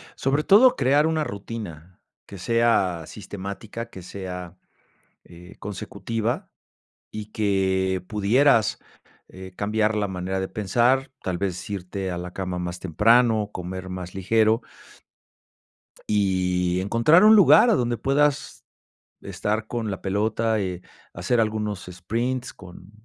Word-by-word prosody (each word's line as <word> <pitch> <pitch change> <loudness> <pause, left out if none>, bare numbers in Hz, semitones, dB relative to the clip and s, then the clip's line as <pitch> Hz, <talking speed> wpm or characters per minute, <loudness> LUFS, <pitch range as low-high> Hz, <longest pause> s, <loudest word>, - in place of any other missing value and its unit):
Sobre 140 +3 0
todo 245 +9 +6
crear 140 +3 +3
una 160 -1 0
rutina, 100 - -8 0.2
que 100 - -11
sea 100 -5 +1
sistemática, 105 +3 -7
que 95 - -10
sea, 90 -1 -8 0.7
eh, 90 +2 -14
consecutiva 105 +3 -4 0.6
y 105 -1 -6
que 95 -3 0
pudieras, 110 +3 +3 0.5
eh, 95 0 -11
cambiar 105 +2 0
la 105 -1 0
manera 95 0 -3
de 95 - -2
pensar, 120 +6 +1
tal 90 -2 -2
vez, 95 -1 -4
irte 95 -1 -4
a 90 - -4
la 90 +1 -7
cama 90 -2 -4
más 90 0 -5
temprano, 110 +4 +3
comer 95 +1 -6
más 90 -1 -7
ligero 110 +4 +2 1.5
y 90 -3 +1
encontrar 115 - +4
un 220 +1 +8
lugar 185 - +7
a 225 - +4
donde 120 -4 0
puedas 140 +3 0 0.6
estar 110 +1 -3
con 115 -2 -3
la 95 - -6
pelota, 110 +2 0
eh, 90 -2 -4 0.3
hacer 95 +8 0
algunos 105 -4 -2
sprints 115 +8 -3
con 90 0 -14
100 Hz, 125 wpm, -24 LUFS, 95-115 Hz, 1.5 s, un